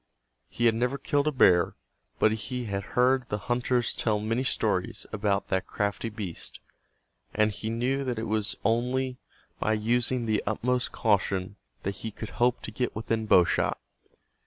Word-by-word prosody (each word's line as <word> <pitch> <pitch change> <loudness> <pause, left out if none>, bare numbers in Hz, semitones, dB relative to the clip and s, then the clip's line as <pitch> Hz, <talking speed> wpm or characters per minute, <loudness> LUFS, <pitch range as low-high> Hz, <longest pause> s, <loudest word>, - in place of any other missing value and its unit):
He 120 - -1
had 115 - +6
never 125 +4 0
killed 145 +1 0
a - - +3
bear 90 -10 +4 0.4
but 110 - +4
he 120 +4 -3
had 100 -2 -2 0.2
heard 125 0 +3
the 105 - -1
hunters 120 +3 0
tell 110 -2 0
many 115 +4 0
stories 130 - -1
about 100 -1 0
that 95 -1 0
crafty 105 +2 -2
beast, 105 -6 -7 0.8
and 110 0 +3
he 110 +2 -5
knew 125 +4 0
that 125 -3 -2
it 110 - -2
was 110 -1 -1
only 125 +3 +1 0.4
by 110 - +1
using 120 +3 +1
the 110 -1 +1
utmost 125 +4 0
caution 100 -3 +1 0.3
that 100 0 -3
he 110 - -4
could 110 +1 -7
hope 125 0 +3
to - - -5
get 125 - -2
within 110 0 -2
bow 90 - +7
shot. - - 0
115 Hz, 165 wpm, -28 LUFS, 105-125 Hz, 0.8 s, bow